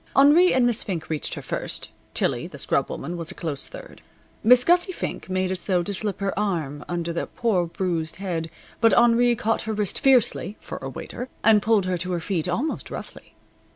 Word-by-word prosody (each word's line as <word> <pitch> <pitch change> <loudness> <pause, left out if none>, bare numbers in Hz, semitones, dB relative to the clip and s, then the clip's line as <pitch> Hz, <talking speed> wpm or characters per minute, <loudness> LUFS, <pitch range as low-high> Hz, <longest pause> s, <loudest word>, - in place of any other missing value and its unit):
Henri 300 +7 +6
and 255 -1 +3
Miss 240 -2 +1
Fink 175 -6 -4
reached 155 - -1
her - - -7
first. - - -3 0.2
Tillie, - - +1
the - - -11
scrub - - 0
woman, 170 +6 -5
was 165 -2 -5
a - - -7
close 150 -5 -2
third. - - -11 0.4
Miss 245 +2 +7
Gussie 350 +4 +3
Fink 350 - -5
made 185 0 0
as 185 - -4
though 180 -3 +1
to 200 - -2
slip 200 0 -3
her 195 0 0
arm 160 -8 -2
under 170 -1 -2
the 170 - -2
poor 195 -7 0
bruised 165 -2 -2
head, 170 -4 -3 0.3
but 225 -1 +5
Henri 240 0 +5
caught 225 0 0
her - - 0
wrist 210 -2 -1
fiercely 245 -6 +3
(for - - -7
a - - -5
waiter) 250 +1 -7
and 215 -1 +6
pulled 215 -2 +2
her 185 -1 -1
to 180 +1 -3
her 175 - 0
feet 175 -1 -2
almost 255 - -2
roughly. - - -9
195 Hz, 205 wpm, -24 LUFS, 175-235 Hz, 0.4 s, Miss